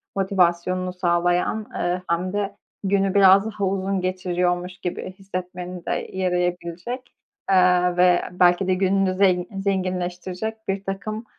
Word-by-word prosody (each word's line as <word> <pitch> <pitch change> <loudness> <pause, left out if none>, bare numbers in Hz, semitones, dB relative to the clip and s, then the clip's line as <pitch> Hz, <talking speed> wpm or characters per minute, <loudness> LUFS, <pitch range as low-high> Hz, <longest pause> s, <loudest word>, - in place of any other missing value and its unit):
motivasyonunu 185 -1 +1
sağlayan, 175 +3 +1
eee, 180 +1 -1
hem 180 +3 -1
de 200 -1 -2 0.3
günü 195 -1 +1
biraz 195 0 +6
daha 205 -2 -2
uzun 195 0 -1
geçiriyormuş 180 0 -1
gibi 180 0 -4
hissetmeni 180 -2 -7
de - - -2 0.2
yarayabilecek, 180 +6 -2 0.4
eee, 180 -1 +4
ve 180 0 +5
belki 180 +1 +3
de 185 - +3
gününü 190 0 +2
zen 185 -2 +3
zenginleştirecek 185 +2 -3
birtakım, 195 +3 -4
185 Hz, 115 wpm, -23 LUFS, 180-195 Hz, 0.4 s, biraz